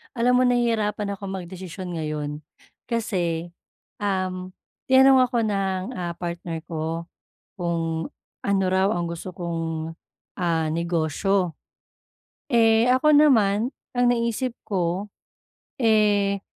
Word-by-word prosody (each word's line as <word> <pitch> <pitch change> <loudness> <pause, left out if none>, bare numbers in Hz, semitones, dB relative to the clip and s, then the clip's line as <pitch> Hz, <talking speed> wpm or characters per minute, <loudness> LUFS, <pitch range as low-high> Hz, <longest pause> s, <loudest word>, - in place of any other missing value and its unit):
Alam 245 +1 +3
mo 255 - +4
nahihirapan 215 -4 +1
akong 195 -2 -6
magdesisyon 185 -1 -7
ngayon 150 -1 -3 0.5
kasi, 175 -8 -1 0.5
um, 185 -2 -2 0.3
tinanong 265 0 +6
ako 240 -1 0
ng, 195 -3 0 0.2
ah, 175 -1 -3
partner 170 -1 -5
ko 165 +1 -3 0.5
kung 165 -2 -1 0.3
ano 195 -1 +1
raw 190 +1 +3
ang 175 -4 0
gusto 170 +2 -6
kong, 165 -2 -3 0.5
ah, 165 -3 +1
negosyo. 170 +3 0 1.0
Eh 225 -1 +5
ako 295 +4 +5
naman 230 -6 +4 0.2
ang 245 0 +3
naisip 235 +1 0 0.2
ko 185 0 -1 0.7
eh, 210 -4 +3
190 Hz, 105 wpm, -24 LUFS, 170-225 Hz, 1.0 s, tinanong